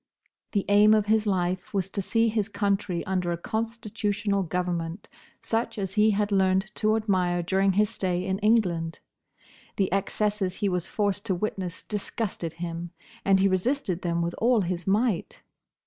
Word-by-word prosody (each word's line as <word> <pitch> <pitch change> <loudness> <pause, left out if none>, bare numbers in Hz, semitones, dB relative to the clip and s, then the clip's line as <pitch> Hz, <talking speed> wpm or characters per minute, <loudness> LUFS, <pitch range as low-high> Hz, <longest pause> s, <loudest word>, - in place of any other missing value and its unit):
The 200 -3 +1
aim 210 +1 +6
of 210 -1 +2
his 215 0 +2
life 185 0 -1
was 190 -2 +1
to 200 - -2
see 225 +4 +2
his 215 -2 0
country 200 -3 -1
under 185 -2 -1
a 170 - -1
constitutional 220 -1 -2
government, 175 0 -3 0.4
such 225 0 -1
as 195 -2 -3
he 215 +1 +4
had 210 0 +1
learnt 190 +1 +2
to 215 0 +2
admire 185 -5 +1
during 190 +2 +2
his 210 +2 +2
stay 180 -1 -1
in 190 0 -1
England. 185 -7 +2 0.8
The 190 -2 0
excesses 200 -1 0
he 205 - 0
was 180 -2 -1
forced 205 -1 -1
to 190 - +1
witness 185 -2 -4
disgusted 205 -5 -4
him, 170 0 -5 0.3
and 195 -1 +4
he 195 - +4
resisted 190 0 0
them 170 -1 0
with 170 0 -2
all 235 -1 +4
his 180 -1 -3
might." 210 -1 0
195 Hz, 165 wpm, -26 LUFS, 180-215 Hz, 0.8 s, aim